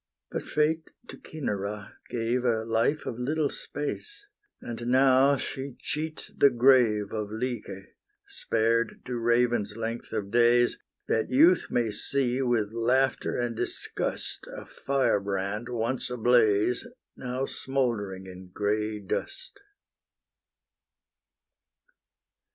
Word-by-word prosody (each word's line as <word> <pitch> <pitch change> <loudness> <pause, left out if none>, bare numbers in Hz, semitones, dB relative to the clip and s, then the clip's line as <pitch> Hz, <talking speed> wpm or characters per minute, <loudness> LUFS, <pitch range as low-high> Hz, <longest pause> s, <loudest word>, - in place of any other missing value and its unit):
but - - -2
Fate 160 +1 0 0.2
to - - -7
Cinara 105 -8 -5 0.2
gave 120 +1 -1
A 110 -3 +1
life 115 +7 +1
of 115 - -5
little 145 +3 0
space; 410 - -6 0.3
And 120 0 -6
now 130 +2 +5
she 135 0 -5
cheats 155 +1 -3
the 140 - +6
grave 120 -5 +4
Of 105 -2 -3
Lyce, 110 -4 -4 0.4
spared 115 0 0
to 125 -1 -3
raven's 120 -2 +1
length 115 +1 -4
of 100 -1 -3
days, 120 +1 +4 0.3
That 110 - 0
youth 165 +7 +5
may 120 -3 0
see, 130 +4 0
with 120 -5 +1
laughter 125 +3 +1
and 120 -1 -1
disgust, - - -3
A - - -8
fire 135 -6 0
brand, 100 +3 -3
once 120 +2 -2
ablaze, 120 -1 +2 0.3
Now 130 +1 -3
smouldering 115 -10 -2
in 95 0 -10
grey 105 +3 -1
dust. 385 - -5
120 Hz, 110 wpm, -27 LUFS, 110-130 Hz, 0.4 s, the